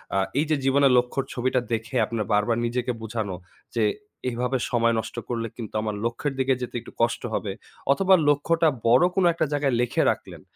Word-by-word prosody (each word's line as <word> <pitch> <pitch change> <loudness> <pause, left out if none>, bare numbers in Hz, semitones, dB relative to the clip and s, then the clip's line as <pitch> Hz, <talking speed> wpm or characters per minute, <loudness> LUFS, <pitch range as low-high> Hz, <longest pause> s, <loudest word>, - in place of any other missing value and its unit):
আ - - +3 0.2
এই 150 - +2
যে 155 - +3
জীবনের 135 0 +4
লক্ষ্যর 125 +2 0
ছবিটা 130 +1 +1
দেখে 115 +4 -3
আপনার 110 -1 -3
বারবার 105 +3 +2
নিজেকে 125 +1 -1
বুঝানো 110 -4 -3 0.4
যে, 115 - +2 0.5
এভাবে 125 +2 -1
সময় 115 -1 +3
নষ্ট 110 0 -6
করলে 115 -1 -2
কিন্তু 115 -4 -7
আমার 105 -1 -2
লক্ষ্যের 120 +4 -2
দিকে 130 0 +3
যেতে 125 - -5
একটু - - -12
কষ্ট 115 0 +1
হবে। 105 - -2 0.4
অথবা 190 +6 +4 0.2
লক্ষ্যটা 165 +3 +2 0.2
বড় 125 +7 +6
কোন 190 - +3
একটা 165 - 0
জায়গায় 140 -3 +1
লিখে 120 - +1
রাখলেন - - -8
120 Hz, 180 wpm, -25 LUFS, 115-135 Hz, 0.5 s, বড়